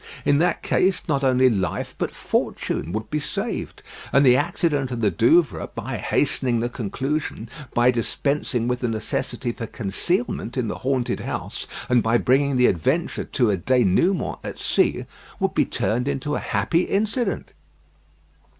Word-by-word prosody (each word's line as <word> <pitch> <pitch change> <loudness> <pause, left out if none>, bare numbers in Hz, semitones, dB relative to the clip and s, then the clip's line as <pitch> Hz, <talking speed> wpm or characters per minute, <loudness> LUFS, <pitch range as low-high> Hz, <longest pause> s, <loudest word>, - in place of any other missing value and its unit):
In 145 - +4
that 175 +2 +1
case, 185 0 +2
not 140 -3 0
only 130 -1 +4
life, 95 -8 -1
but - - -2
fortune, 85 - -2
would 110 +3 -4
be 150 - 0
saved; - - -4 0.3
and 140 +1 +5
the 125 -1 +7
accident 150 -3 0
of 120 -2 -4
the 105 -3 +3
Douvres, 115 - +3
by - - -4
hastening 120 -3 +1
the 120 +1 -1
conclusion, 130 +2 -3 0.3
by 120 +1 +5
dispensing 125 0 -1
with 125 0 0
the 125 - -1
necessity 115 +1 -2
for 115 -1 -6
concealment 120 - -2
in 120 -4 0
the - - -5
haunted 130 -2 -1
house, - - -4 0.2
and 125 -1 +4
by 115 +1 +3
bringing 135 +2 +2
the 125 - +5
adventure 130 - 0
to 120 -5 +1
a 100 - 0
dénouement 125 - +2
at - - -6
sea, - - +1 0.3
would - - 0
be - - +3
turned 125 +4 -1
into 140 +1 -2
a - - 0
happy 170 0 +1
incident. 215 +6 -1
125 Hz, 160 wpm, -23 LUFS, 115-145 Hz, 0.3 s, the